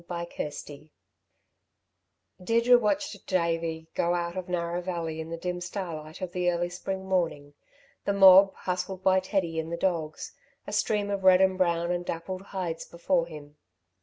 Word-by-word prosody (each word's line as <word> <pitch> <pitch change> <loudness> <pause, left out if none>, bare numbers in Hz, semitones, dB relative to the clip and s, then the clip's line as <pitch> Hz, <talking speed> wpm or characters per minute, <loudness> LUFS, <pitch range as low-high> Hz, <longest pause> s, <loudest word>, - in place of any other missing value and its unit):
CHAPTER 170 -1 -4
XXXIX 150 0 -9 1.5
Deirdre 235 +4 +5
watched 235 -1 -2
Davey 165 -2 -1
going 175 +1 +1
out 170 +1 -4
of 185 -1 -5
Narrow 175 0 -1
Valley 170 -3 -4
in 160 - -8
the 165 - -4
dim 180 +1 -4
starlight 170 -3 -6
of 185 -2 -4
the 180 0 +1
early 175 0 0
spring 190 +2 -5
morning, 165 -6 -1 0.5
the 200 - +1
mob, 195 0 +8
hustled 180 +1 -4
by 190 0 +5
Teddy 185 -4 -1
and 160 +1 -4
the 170 - -2
dogs, 165 -4 -2 0.3
a - - -7
stream 205 -1 0
of 200 -1 -2
red 185 -1 +7
and 190 0 +4
brown 170 -2 +1
and 175 0 -1
dappled 180 +2 -5
hides 185 -4 -4
before 170 0 0
him. 150 -2 -11
175 Hz, 165 wpm, -28 LUFS, 165-190 Hz, 1.5 s, mob